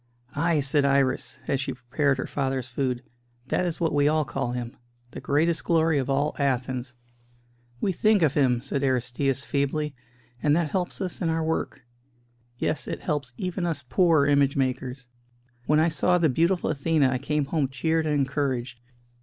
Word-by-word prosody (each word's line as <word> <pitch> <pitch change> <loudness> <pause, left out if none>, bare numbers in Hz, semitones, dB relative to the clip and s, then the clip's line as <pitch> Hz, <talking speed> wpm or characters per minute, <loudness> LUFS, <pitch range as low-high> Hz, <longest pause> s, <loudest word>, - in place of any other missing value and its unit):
"Ay," 165 +1 +2
said 140 +1 +2
Iris, 135 -2 +1
as 135 -1 0
she - - -3
prepared 135 +3 0
her 130 - -3
father's 135 -3 -2
food, 125 0 -2 0.5
"that 180 - +1
is 170 - -4
what 165 -2 0
we 145 0 +3
all 155 0 +2
call 135 -2 -3
him 120 -1 -5 0.4
the - - -8
greatest 160 +3 +1
glory 160 -3 +2
of 130 0 -3
all 140 +2 +1
Athens." 130 -2 -1 0.8
"We 195 - +1
think 210 +1 +3
of 145 -4 +3
him," 125 -5 +2
said 135 +1 -2
Aristćus, 130 +1 0
feebly, 145 +1 -1 0.5
"and 150 0 +3
that 165 -3 0
helps 185 +1 -2
us 185 -2 -4
in 170 - +1
our 160 0 0
work. 160 -4 -3 0.7
Yes, 155 - -2
it - - -4
helps 140 -4 -2
even 185 0 -3
us 165 -5 -2
poor 165 -1 +4
image 140 -1 +3
makers. 130 -1 -2 0.6
When 150 0 +4
I 160 +2 +4
saw 175 +3 +2
the 165 -3 +3
beautiful 170 +7 +1
Athena 145 -1 +2
I 130 - -1
came 150 +1 -1
home 145 -1 0
cheered 160 +5 0
and 150 - +1
encouraged. 135 -3 -1
140 Hz, 175 wpm, -26 LUFS, 130-160 Hz, 0.8 s, poor